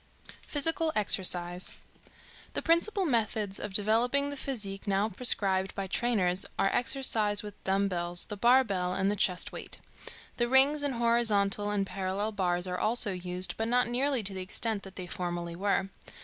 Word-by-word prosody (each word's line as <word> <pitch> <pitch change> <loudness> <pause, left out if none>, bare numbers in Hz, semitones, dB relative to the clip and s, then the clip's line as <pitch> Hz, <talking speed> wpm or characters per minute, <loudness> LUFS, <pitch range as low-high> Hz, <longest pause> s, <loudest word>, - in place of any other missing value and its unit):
PHYSICAL 320 +2 +1
EXERCISE. 180 -3 +3 0.8
The - - -3
principal 365 +4 +2
methods 215 - -1
of 210 - -5
developing 240 +7 +2
the - - -5
physique 210 -9 -4
now 200 +2 +1
prescribed 195 -3 +1
by 195 - -3
trainers 190 -3 0
are 195 - +1
exercise 220 -5 +2
with 210 -1 -11
dumbbells, 180 -3 0
the 210 - -7
bar 245 +5 +4
bell 180 -5 -2
and 195 +1 0
the - - -1
chest 180 -2 +1
weight. - - -3 0.6
The 240 - +1
rings 270 +4 +4
and 285 -3 0
horizontal 215 -4 +1
and 205 -1 0
parallel 195 +2 -3
bars 180 -3 -1
are 180 -1 -4
also 220 -1 +4
used, 180 0 -1
but 225 - -2
not 245 +1 +2
nearly 255 0 0
to 195 0 -5
the 190 - -4
extent 210 +3 -2
that 195 -1 -12
they 185 - -6
formerly 175 -1 -5
were. 195 +1 -1
205 Hz, 165 wpm, -29 LUFS, 190-240 Hz, 0.8 s, bar